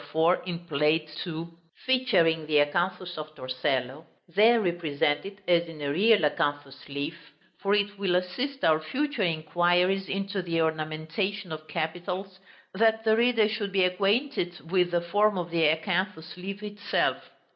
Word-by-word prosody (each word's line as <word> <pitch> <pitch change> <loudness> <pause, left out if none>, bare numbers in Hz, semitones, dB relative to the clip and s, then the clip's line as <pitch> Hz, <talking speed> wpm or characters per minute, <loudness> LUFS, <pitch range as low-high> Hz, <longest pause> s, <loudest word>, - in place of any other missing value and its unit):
4 165 +3 +3
in 175 -2 -2
Plate 155 +1 +1 0.2
II., 165 0 -5 0.4
there 255 -8 +3 2.4
represented 175 +1 -1
as 170 -1 +4
in 165 -2 -10
a 145 -1 -2
real 205 +2 +4
acanthus 145 -1 -2
leaf; 140 +3 -3 0.5
for 200 +1 +2
it 205 -1 -1
will 190 -3 +1
assist 250 +10 -2
our 155 -1 +4
future 260 - -2
inquiries 175 +3 +1
into 195 0 -2
the 170 -2 -2
ornamentation 160 +5 -2
of 155 0 -7
capitals 180 +4 -4 0.3
that 225 +2 +2
the 220 -1 +4
reader 230 -2 +3
should 210 -2 -3
be 195 -1 +3
acquainted 180 - 0
with 180 -2 +3
the 175 -1 +1
form 205 +4 +2
of 175 -1 -4
the 165 -2 +3
acanthus 165 +1 -1
leaf 195 +3 -7
itself. 205 -1 -1
180 Hz, 130 wpm, -27 LUFS, 160-205 Hz, 2.4 s, as